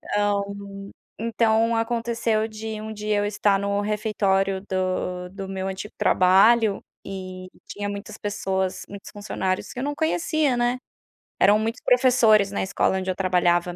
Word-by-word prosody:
ah, 205 Hz, 0 st, +2 dB
hum, 200 Hz, 0 st, -8 dB, 0.3 s
então 230 Hz, 0 st, +2 dB
aconteceu 230 Hz, -1 st, 0 dB
de 220 Hz, 0 st, -6 dB
um 220 Hz, 0 st, -6 dB
dia 210 Hz, 0 st, -1 dB
eu 205 Hz, -, +1 dB
estar 205 Hz, -1 st, +1 dB
no 200 Hz, 0 st, -1 dB
refeitório 195 Hz, -2 st, 0 dB
do 185 Hz, -1 st, -2 dB
do 195 Hz, 0 st, -7 dB
meu 190 Hz, 0 st, -3 dB
antigo 195 Hz, +2 st, -6 dB
trabalho 200 Hz, +3 st, +4 dB, 0.3 s
e 185 Hz, -1 st, -7 dB, 0.2 s
tinha 205 Hz, 0 st, -4 dB
muitas 200 Hz, 0 st, -7 dB
pessoas, 190 Hz, -2 st, -2 dB
muitos 200 Hz, 0 st, -10 dB
funcionários 190 Hz, -2 st, -3 dB
que 250 Hz, -, -6 dB
eu -, -, -2 dB
não 290 Hz, +1 st, -1 dB
conhecia, 315 Hz, -4 st, +1 dB
né, 240 Hz, +1 st, +1 dB, 0.6 s
eram 205 Hz, +2 st, +6 dB
muitos 225 Hz, +3 st, -3 dB
professores 235 Hz, -5 st, +4 dB
na -, -, -2 dB
escola 190 Hz, 0 st, +1 dB
onde 185 Hz, 0 st, -3 dB
eu 185 Hz, -, 0 dB
trabalhava, 175 Hz, -2 st, +1 dB
205 Hz, 155 wpm, -24 LUFS, 190-225 Hz, 0.6 s, eram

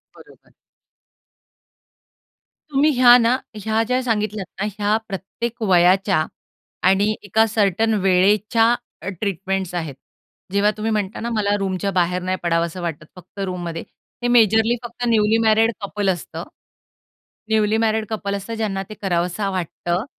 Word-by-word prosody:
बरोबर. -, -, -19 dB, 2.2 s
तुम्ही 290 Hz, +2 st, +3 dB
ह्या 245 Hz, -1 st, +8 dB
ना, 235 Hz, +1 st, +3 dB, 0.2 s
ह्या 220 Hz, +1 st, 0 dB
ज्या 250 Hz, +3 st, 0 dB
सांगितल्यात 215 Hz, -4 st, -1 dB, 0.2 s
ना -, -, +1 dB
ह्या 205 Hz, +1 st, +2 dB
प्रत्येक 230 Hz, +5 st, -5 dB
वयाच्या 185 Hz, -1 st, +4 dB, 0.6 s
आणि 195 Hz, +2 st, +4 dB, 0.2 s
एका 215 Hz, +3 st, +3 dB
सर्टन 220 Hz, 0 st, +1 dB
वेळेच्या 200 Hz, +4 st, +3 dB, 0.4 s
अ, 170 Hz, -, -8 dB
ट्रीटमेंट्स 195 Hz, -2 st, -2 dB
आहेत. 160 Hz, -6 st, -4 dB, 0.6 s
जेव्हा 200 Hz, +1 st, +3 dB
तुम्ही 220 Hz, +1 st, -2 dB
म्हणता 210 Hz, -2 st, -2 dB
ना, 235 Hz, -, -3 dB
मला 205 Hz, -1 st, +1 dB
रूमच्या 195 Hz, 0 st, -2 dB
बाहेर 180 Hz, 0 st, 0 dB
नाही 185 Hz, +1 st, -2 dB
पडावसं 170 Hz, +1 st, 0 dB
वाटतं, 160 Hz, -3 st, -4 dB
फक्त 180 Hz, +2 st, -14 dB
रूममध्ये 175 Hz, -3 st, -4 dB, 0.4 s
हे -, -, +2 dB
मेजरली 225 Hz, -1 st, +4 dB
फक्त 240 Hz, +1 st, -7 dB
न्यूली 220 Hz, -1 st, +3 dB
मॅरिड 220 Hz, +1 st, +4 dB
कपल 200 Hz, 0 st, -2 dB
असतं. 180 Hz, -3 st, -4 dB, 1.1 s
न्यूली 215 Hz, 0 st, +2 dB
मॅरिड 220 Hz, -1 st, +1 dB
कपल 200 Hz, -2 st, -3 dB
असतात, 200 Hz, +3 st, -5 dB
ज्यांना 205 Hz, -3 st, -2 dB
ते -, -, -7 dB
करावसा 180 Hz, +1 st, -1 dB
वाटतं. 180 Hz, +1 st, -3 dB
205 Hz, 135 wpm, -21 LUFS, 185-220 Hz, 2.2 s, ह्या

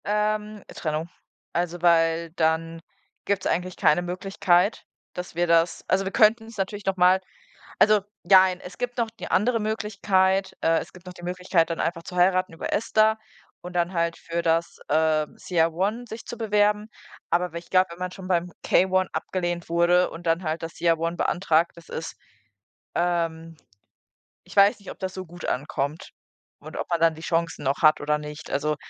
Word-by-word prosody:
Ähm, 210 Hz, 0 st, -1 dB
Trennung. 155 Hz, +1 st, -3 dB, 0.4 s
Also, 175 Hz, 0 st, -2 dB
weil 165 Hz, -1 st, +3 dB
dann 165 Hz, 0 st, 0 dB, 0.5 s
gibt's 200 Hz, -2 st, -1 dB
eigentlich 180 Hz, +1 st, -1 dB
keine 155 Hz, +4 st, +3 dB
Möglichkeit, 185 Hz, +2 st, +1 dB, 0.3 s
dass 180 Hz, -2 st, -7 dB
wir 175 Hz, +1 st, +2 dB
das 165 Hz, 0 st, +2 dB
also, 195 Hz, +1 st, +1 dB
wir 190 Hz, -, -3 dB
könnten 220 Hz, +2 st, +4 dB
es 225 Hz, -1 st, -12 dB
natürlich 200 Hz, +1 st, -3 dB
noch 195 Hz, -1 st, 0 dB
mal 180 Hz, +1 st, +5 dB, 0.6 s
also, 215 Hz, -1 st, +6 dB, 0.2 s
jein, 185 Hz, 0 st, +5 dB
es 180 Hz, -, -11 dB
gibt 245 Hz, 0 st, -4 dB
noch 230 Hz, -2 st, 0 dB
die -, -, -6 dB
andere 230 Hz, +5 st, +2 dB
Möglichkeit, 200 Hz, -3 st, +1 dB
äh 165 Hz, 0 st, +3 dB
es -, -, -7 dB
gibt 180 Hz, 0 st, -16 dB
noch 180 Hz, -, -7 dB
die 175 Hz, -, -11 dB
Möglichkeit, 180 Hz, -1 st, 0 dB
dann 165 Hz, -, -2 dB
einfach 165 Hz, 0 st, -2 dB
zu -, -, -9 dB
heiraten 185 Hz, 0 st, +2 dB
über 165 Hz, -, -5 dB
ESTA 220 Hz, +1 st, +2 dB, 0.4 s
und 180 Hz, -, -8 dB
dann 175 Hz, +1 st, 0 dB
halt 170 Hz, -1 st, 0 dB
für 170 Hz, 0 st, -4 dB
das, 165 Hz, +1 st, 0 dB
ähm, 155 Hz, 0 st, +1 dB
CR-1 185 Hz, +8 st, 0 dB
sich 220 Hz, 0 st, -8 dB
zu 240 Hz, -, -7 dB
bewerben. 210 Hz, -1 st, +2 dB, 0.4 s
Aber 180 Hz, +1 st, +1 dB
wenn 170 Hz, -, -4 dB
ich 170 Hz, -, -14 dB
glaube, 185 Hz, 0 st, +4 dB
wenn 170 Hz, -, -10 dB
man 180 Hz, 0 st, -4 dB
schon 185 Hz, -1 st, -9 dB
beim 175 Hz, -1 st, 0 dB
K-1 185 Hz, 0 st, +2 dB
abgelehnt 175 Hz, -2 st, -3 dB
wurde 175 Hz, +2 st, +3 dB
und 170 Hz, +1 st, -10 dB
dann 165 Hz, +2 st, +1 dB
halt 160 Hz, +1 st, -2 dB
das 165 Hz, 0 st, -6 dB
CR-1 165 Hz, 0 st, 0 dB
beantragt, 170 Hz, -3 st, +1 dB
das 170 Hz, -1 st, -16 dB
ist, 160 Hz, -, -5 dB, 0.8 s
ähm 165 Hz, -2 st, -1 dB, 0.9 s
ich -, -, -14 dB
weiß 200 Hz, +1 st, +5 dB
nicht, 200 Hz, -, -11 dB
ob -, -, -11 dB
das 190 Hz, -1 st, -4 dB
so 185 Hz, 0 st, -6 dB
gut 175 Hz, +1 st, -10 dB
ankommt 145 Hz, +3 st, -3 dB, 0.5 s
und -, -, -10 dB
ob -, -, -4 dB
man 170 Hz, -1 st, +1 dB
dann 165 Hz, -1 st, +5 dB
die 160 Hz, -, -11 dB
Chancen 165 Hz, -2 st, -1 dB
noch 135 Hz, +1 st, 0 dB
hat 155 Hz, 0 st, +5 dB
oder 150 Hz, +1 st, +1 dB
nicht. 150 Hz, +1 st, -9 dB
Also, 150 Hz, +2 st, 0 dB
175 Hz, 185 wpm, -25 LUFS, 165-195 Hz, 0.9 s, also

